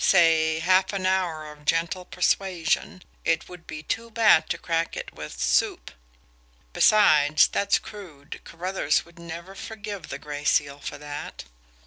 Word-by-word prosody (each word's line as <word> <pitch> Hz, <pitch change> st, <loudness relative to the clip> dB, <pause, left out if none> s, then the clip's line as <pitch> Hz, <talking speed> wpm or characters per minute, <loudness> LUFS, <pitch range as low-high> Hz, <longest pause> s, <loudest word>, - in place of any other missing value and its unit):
Say, 160 Hz, -3 st, +4 dB
half 185 Hz, +3 st, +3 dB
an 190 Hz, -1 st, -2 dB
hour 170 Hz, -5 st, -1 dB
of 150 Hz, 0 st, -16 dB
gentle 165 Hz, +4 st, 0 dB
persuasion. 180 Hz, -1 st, -1 dB, 0.2 s
It 165 Hz, 0 st, 0 dB
would 180 Hz, -1 st, -13 dB
be 155 Hz, -, -7 dB
too 230 Hz, +8 st, -3 dB
bad 215 Hz, -8 st, +4 dB
to -, -, -1 dB
crack 165 Hz, 0 st, -2 dB
it -, -, -6 dB
with 75 Hz, 0 st, -9 dB
'soup' -, -, +1 dB, 0.8 s
besides, 155 Hz, -8 st, +5 dB
that's 200 Hz, 0 st, +1 dB
crude 165 Hz, -8 st, -11 dB
Carruthers 175 Hz, -3 st, -1 dB
would 170 Hz, 0 st, -19 dB
never 170 Hz, +2 st, -8 dB
forgive 205 Hz, -3 st, -7 dB
the -, -, -5 dB
Gray 145 Hz, -1 st, -7 dB
Seal 145 Hz, -1 st, +1 dB
for 145 Hz, -, -6 dB
that!" 145 Hz, 0 st, -7 dB
170 Hz, 145 wpm, -25 LUFS, 155-190 Hz, 0.8 s, besides